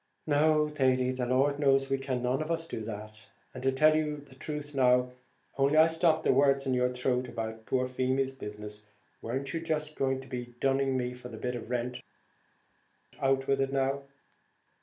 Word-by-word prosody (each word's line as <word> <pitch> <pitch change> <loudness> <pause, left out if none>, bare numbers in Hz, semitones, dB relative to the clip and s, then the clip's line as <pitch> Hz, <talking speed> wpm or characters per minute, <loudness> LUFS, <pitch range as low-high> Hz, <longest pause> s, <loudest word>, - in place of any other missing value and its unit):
"No, 150 +1 +3
Thady, 130 -4 +2
the 130 -1 -2
Lord 140 +3 +2
knows 135 -1 +3
we 135 - +1
can 130 -2 -2
none 125 +3 +1
of 155 - -4
us 165 -1 -1
do 115 - -5
that 110 0 -8 0.3
and, 130 - -7 0.2
tell 155 +2 +6
the 150 -3 -2
truth 150 0 -5
now, 125 -2 +3 0.5
only 140 +3 +3
I 160 - +8
stopped 165 -1 +2
the - - +4
words 140 0 +3
in 130 - 0
your 125 0 +2
throat 125 0 -1
about 110 -1 -6
poor 130 -1 +1
Feemy's 130 +1 0
business, 105 -4 -8 0.3
weren't 130 +3 -3
you 165 - -2
just 155 -2 -2
going 135 -2 0
to 135 - -13
be 120 -1 -6
dunning 135 -1 +1
me 125 0 -2
for 125 0 -10
the 115 - -8
bit 125 +2 -3
of 120 -1 -7
rent? 125 0 -2 1.2
out 135 0 +2
with 135 0 +1
it 135 0 0
now." 135 0 0
135 Hz, 185 wpm, -30 LUFS, 125-145 Hz, 1.2 s, I